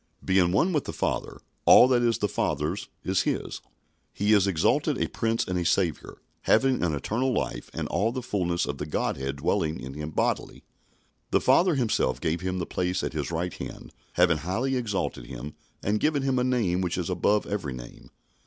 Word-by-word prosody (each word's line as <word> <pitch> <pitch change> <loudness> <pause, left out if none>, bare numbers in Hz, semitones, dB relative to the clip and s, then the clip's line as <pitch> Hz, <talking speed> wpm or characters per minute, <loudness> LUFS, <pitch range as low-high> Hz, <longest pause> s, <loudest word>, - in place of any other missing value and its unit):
Being 95 -2 +3
one 170 - +2
with 150 - 0
the - - -5
Father, - - -2 0.2
all 125 - +8
that 125 -2 +3
is 115 -2 +2
the 105 - 0
Father's 75 0 -2 0.2
is - - +1
His. - - -2 0.5
He 105 +2 +2
is 100 -2 +4
exalted 85 -5 +2
a - - +1
Prince 115 0 -1
and 90 -1 -1
a - - -1
Saviour, 85 -3 0 0.2
having 135 -1 +3
an 80 -4 +1
eternal 115 - -1
life - - -2
and - - -4
all 110 +3 +1
the 130 0 -4
fulness 90 -6 0
of 70 - -4
the 75 - -4
Godhead 70 -2 -2
dwelling 80 0 0
in 65 +1 -7
Him 75 +1 -5
bodily. 80 - -1 0.7
The - - +3
Father 175 -2 +4
Himself 115 - +1
gave 80 +2 -1
Him 95 0 -2
the 85 - -2
place 90 0 -1
at - - -3
His 75 -2 -2
right 85 +1 -2
hand, - - -8 0.2
having 85 -2 +4
highly 110 - -1
exalted 100 - -2
Him 65 +4 -7 0.3
and 105 +2 +1
given 150 0 +1
Him 135 -2 +1
a - - +2
name 115 -8 +1
which 90 -2 -1
is 90 -3 -2
above 100 +4 +2
every 95 -10 -3
name. - - -11
95 Hz, 195 wpm, -27 LUFS, 80-115 Hz, 0.7 s, all